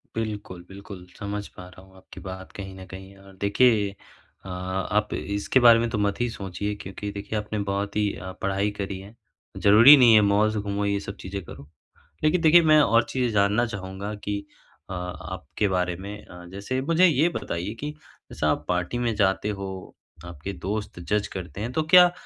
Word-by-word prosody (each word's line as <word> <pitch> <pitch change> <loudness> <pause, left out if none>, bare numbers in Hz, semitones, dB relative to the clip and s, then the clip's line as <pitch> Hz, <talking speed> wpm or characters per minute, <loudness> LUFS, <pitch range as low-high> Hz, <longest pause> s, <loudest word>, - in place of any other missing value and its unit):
बिल्कुल, 105 -5 -5
बिल्कुल। 95 -1 -10
समझ 100 0 -4
पा 90 - -10
रहा 90 0 -15
हूँ 95 0 -21
आपकी 95 - -13
बात 95 0 -8
कहीं 95 -1 -7
न 95 - -9
कहीं। 95 +1 -11
और 95 0 -16
देखिए 105 0 +3 0.6
अ, 95 - -8
आप 95 +3 -2
इसके 100 +6 0
बारे 120 -2 +7
में 115 0 0
तो 115 - -2
मत 100 -1 0
ही 120 - +1
सोचिए 100 0 -4
क्योंकि 100 +2 -6
देखिए, 100 +2 -5
आपने 105 0 -4
बहुत 100 +1 -2
ही 105 -1 +2
अ, 95 0 -7
पढ़ाई 100 +1 0
करी 100 -2 -5
है, 100 +4 -13 0.4
ज़रूरी 110 +8 +8
नहीं 120 -4 +7
है 110 - +7
मॉल्स 105 +2 +2
घूमो, 100 0 -2
ये 100 0 0
सब 100 0 -7
चीज़ें 95 0 -6
करो। 70 - -11 0.6
लेकिन 160 +3 +3
देखिए, 165 +1 +7
मैं 155 -1 +6
और 115 -3 +4
चीज़ें 125 -3 0
जानना 105 +3 +2
चाहूँगा 100 -1 -6
कि 105 0 -2 0.5
अ, - - -4
आपके 90 +3 -4
बारे 90 -1 0
में 100 +3 -8
अ, 90 0 -12
जैसे 105 +7 -3
मुझे 165 +6 +4
ये 155 0 +3
बताइए 90 +6 -4
कि 150 - -3 0.4
जैसा - - 0
आप - - -1
पार्टी 90 +6 -1
में 120 -2 0
जाते 100 0 +1
हो, 95 - -4 0.6
आपके 85 +2 -7
दोस्त 105 -2 -3
जज 105 +4 -1
करते 90 0 -7
हैं, 115 +4 -3
तो 160 - 0
क्या 180 -1 +10
अ, 175 - -2
100 Hz, 195 wpm, -25 LUFS, 95-110 Hz, 0.6 s, क्या